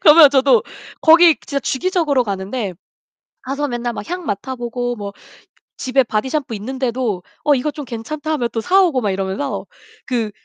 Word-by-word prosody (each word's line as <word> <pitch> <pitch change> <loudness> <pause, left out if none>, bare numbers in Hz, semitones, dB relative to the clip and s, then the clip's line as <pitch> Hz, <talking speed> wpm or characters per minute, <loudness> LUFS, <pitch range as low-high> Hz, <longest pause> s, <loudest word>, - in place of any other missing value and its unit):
그러면 305 -1 +9
저도 265 -4 +4 0.4
거기 330 0 +7
진짜 280 -1 -2
주기적으로 290 -2 +1
가는데 200 0 -3 0.7
가서 280 +2 -2
맨날 240 -1 -2
막 - - -7
향 360 -1 -3
맡아보고 245 +2 -3
뭐 200 -1 -6 0.6
집에 260 +1 +2
바디샴푸 255 +3 -2
있는데도 240 -3 -2 0.2
어 295 - +5
이거 280 +3 0
좀 290 -1 -7
괜찮다 290 +7 -5
하면 245 -6 0
또 225 - -1
사오고 360 - +3
막 210 -4 0
이러면서 190 +7 -3 0.4
그 235 -4 -1
255 Hz, 325 characters per minute, -19 LUFS, 225-295 Hz, 0.7 s, 그러면